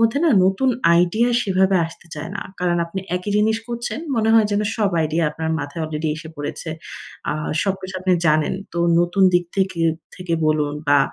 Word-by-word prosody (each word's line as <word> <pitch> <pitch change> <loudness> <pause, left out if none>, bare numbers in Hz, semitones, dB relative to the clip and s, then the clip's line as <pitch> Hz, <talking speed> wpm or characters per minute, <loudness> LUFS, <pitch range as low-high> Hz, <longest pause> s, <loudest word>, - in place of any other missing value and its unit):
মধ্যে 230 +5 +3
না, 325 - +4
নতুন 195 +8 +2 0.3
আইডিয়া 180 +8 +3
সেভাবে 190 0 +2
আসতে 165 +1 -14
চায় 155 +3 -6
না। - - -4 0.2
কারণ 175 -1 +1
আপনি 190 +3 -5 0.2
একই 180 +3 -4
জিনিস 220 +1 +3
করছেন, 235 +4 -4 0.2
মনে 220 0 +2
হয় 220 -2 +5
যেন 205 - +2 0.2
সব 210 -3 +1
আইডিয়া 160 +1 +1
আপনার 160 +1 -3
মাথায় 145 +3 -5
অলরেডি 155 0 -3
এসে 160 0 -9
পড়েছে। 145 +3 -5 0.6
আ - - 0 0.3
সবকিছু 190 -1 -3
আপনি 185 0 +1
জানেন। 155 +3 +2 0.2
তো 170 - -3 0.2
নতুন 175 +3 +1
দিক 175 0 +3
থেকে 190 -3 0 0.4
থেকে 180 -2 -2
বলুন, 150 -1 +1 0.2
বা 145 0 +6
180 Hz, 185 wpm, -21 LUFS, 160-205 Hz, 0.6 s, বা